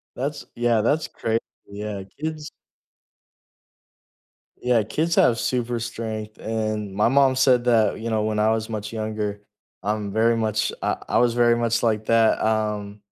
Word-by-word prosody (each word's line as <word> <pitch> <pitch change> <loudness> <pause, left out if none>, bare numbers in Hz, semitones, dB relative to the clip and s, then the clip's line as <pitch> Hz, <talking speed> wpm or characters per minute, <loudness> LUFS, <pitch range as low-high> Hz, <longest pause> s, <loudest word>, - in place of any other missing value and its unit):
That's 145 +3 -4
yeah, 120 -2 +2
that's 150 +7 +1
crazy, 115 0 -1 0.3
yeah. 100 -1 -5 0.2
Kids 155 -1 -4 2.1
Yeah, 125 -3 +2
kids 160 +11 -1
have 115 -1 +4
super 120 -1 -1
strength, 110 -2 -5
and 110 -2 -3
my 105 +4 +2
mom 135 -1 +4
said 130 -2 +4
that, 110 -4 +3
you 115 +1 -4
know, 110 -1 0
when 110 0 -1
I 110 +1 +3
was 110 0 -1
much 105 0 -5
younger, 105 -2 -3 0.4
I'm 105 -1 -2
very 115 +1 +3
much 110 -1 0
I - - 0
I - - +2
was 120 -1 +3
very 120 0 +4
much 115 0 0
like 110 -2 +1
that, 115 0 +3
um 105 -2 -1
110 Hz, 155 wpm, -23 LUFS, 105-120 Hz, 2.1 s, have